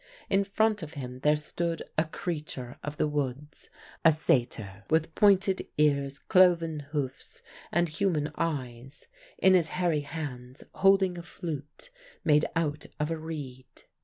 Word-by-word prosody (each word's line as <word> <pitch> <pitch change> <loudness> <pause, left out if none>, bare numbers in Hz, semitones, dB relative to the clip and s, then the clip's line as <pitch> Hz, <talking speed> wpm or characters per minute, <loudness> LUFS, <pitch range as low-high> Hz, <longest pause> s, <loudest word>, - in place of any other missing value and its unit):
In 195 +1 +4
front 210 +1 +1
of 160 -1 -8
him 125 -2 -6
there 150 +3 +4
stood 165 +2 -3
a 155 - +2
creature 150 -6 -5
of 150 0 -5
the 150 - +2
woods, 145 0 -4 0.3
a 165 - +8
satyr, 120 - 0
with 160 0 +1
pointed 195 -1 +3
ears, 140 -2 +2
cloven 170 -4 +4
hoofs, 140 -3 -5 0.3
and 175 +1 +2
human 160 -2 0
eyes, 135 -4 -4 0.3
in 190 - +5
his 175 -3 +4
hairy 175 -4 +2
hands 140 -4 -7
holding 195 -2 +3
a - - -5
flute 170 - -7 0.3
made 150 0 +4
out 150 -2 -1
of 150 +2 -1
a - - 0
reed. 135 -5 -8
155 Hz, 140 wpm, -29 LUFS, 140-175 Hz, 0.3 s, a